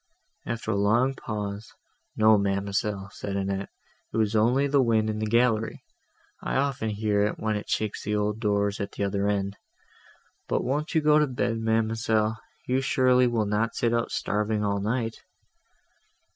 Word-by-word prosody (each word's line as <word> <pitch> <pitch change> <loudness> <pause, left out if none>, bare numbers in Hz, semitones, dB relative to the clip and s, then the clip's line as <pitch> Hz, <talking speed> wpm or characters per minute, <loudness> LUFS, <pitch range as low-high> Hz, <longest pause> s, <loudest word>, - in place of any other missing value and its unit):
After 115 -1 -3
a - - 0
long 115 +7 +2
pause, 105 -3 -5 0.5
"No, 110 0 +6
ma'amselle," 100 0 -1
said 100 -1 -5
Annette, 100 0 -2 0.4
"it - - -3
was 110 -1 +1
only 120 +6 +3
the 140 -1 +3
wind 110 -3 +2
in 105 - -4
the 110 - -1
gallery; 115 -1 +1 0.6
I - - -3
often 135 -5 0
hear 105 -1 0
it, 105 +1 0
when 110 -1 -1
it 105 - -5
shakes 110 -1 -2
the 105 +1 -1
old 105 +1 -1
doors, 100 -2 0
at 100 - -4
the - - -3
other 100 0 0
end. 100 -1 -1 0.9
But - - 0
won't 150 +6 -2
you 160 - +4
go 150 0 +5
to 150 - +3
bed, 120 -3 -1
ma'amselle? 110 0 +1 0.3
you 130 +1 +1
surely 130 -1 +3
will 115 -3 0
not 105 +3 0
sit 120 -1 +1
up 115 0 0
starving, 105 0 -1
all 100 0 0
night." 115 +2 -1
110 Hz, 170 wpm, -26 LUFS, 105-120 Hz, 0.9 s, No